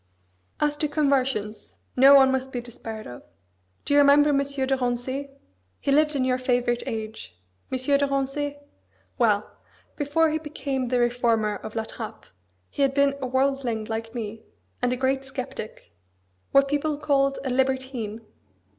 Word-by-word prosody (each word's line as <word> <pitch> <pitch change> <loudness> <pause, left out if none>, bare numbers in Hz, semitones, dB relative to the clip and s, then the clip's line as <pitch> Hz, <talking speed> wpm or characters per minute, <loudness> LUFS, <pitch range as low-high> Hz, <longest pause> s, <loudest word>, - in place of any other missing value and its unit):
"As 295 0 +1
to 300 - 0
conversions; 270 -8 -1 0.2
no 270 +2 +8
one 265 -1 +7
must 265 0 -2
be 245 - -3
despaired 225 -2 -8
of. 120 - -9 0.6
Do - - 0
you 290 - +6
remember 285 +1 +6
M. 285 - +3
de - - +2 0.3
Rancé? 260 +3 -2 0.5
He 280 - -1
lived 300 +1 +3
in 260 -2 +1
your 255 0 +1
favourite 245 -1 +1
age; 215 - -6 0.3
M. 260 - 0
de 280 +2 +2
Rancé. 275 +1 -2 0.6
Well! 210 -4 +3 0.5
before 310 +2 +2
he 315 - -1
became 275 -4 -3
the 250 0 +1
reformer 235 -3 +1
of 215 - -9
La 225 - 0
Trappe 220 0 -8 0.5
he - - -4
had 275 -1 +2
been 280 -1 +4
a 260 - -2
worldling 260 -4 0
like 225 +1 -5
me, 220 -1 -5 0.4
and 245 0 +1
a 250 - -1
great 265 +1 0
sceptic 265 -4 -7 0.6
what 275 0 +5
people 290 +1 -1
called 275 -2 +1
a 260 - -1
libertine. 260 -4 -1
260 Hz, 155 wpm, -25 LUFS, 240-280 Hz, 0.6 s, no